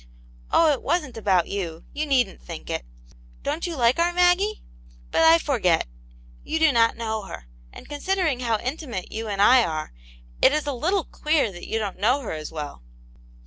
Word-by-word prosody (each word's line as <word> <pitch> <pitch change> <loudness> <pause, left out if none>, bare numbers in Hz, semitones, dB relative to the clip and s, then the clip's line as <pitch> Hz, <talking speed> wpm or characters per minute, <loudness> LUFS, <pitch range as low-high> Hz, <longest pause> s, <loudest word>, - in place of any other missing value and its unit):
Oh, 325 -2 +4
it 270 - -4
wasn't 305 -4 -1
about 190 -6 +2
you; 170 -5 -4
you 300 +1 -2
needn't 255 - +1
think - - -8
it! - - -2 0.6
Don't 310 +5 -2
you 340 - -4
like 245 +2 +2
our 345 +1 +3
Maggie? 360 +4 +2 0.5
But - - +2
I 325 +1 +7
forget; 225 - +1 0.6
you 320 - -2
do 320 -1 +4
not 230 -2 +3
know 220 -2 -2
her; 60 - -9 0.3
and - - -12
considering 315 -2 -1
how 230 -3 0
intimate 255 - -5
you 225 +1 -4
and 200 -2 -3
I 245 +4 +6
are, 155 - -4 0.5
it 270 - +6
is 305 0 0
a 290 - -2
little 345 +9 0
queer 300 -9 0
that 175 -1 -10
you 225 - -1
don't 205 -4 -4
know 250 +8 +2
her 240 - -5
as 155 -1 -6
well." 150 - -7
250 Hz, 185 wpm, -24 LUFS, 205-315 Hz, 0.6 s, I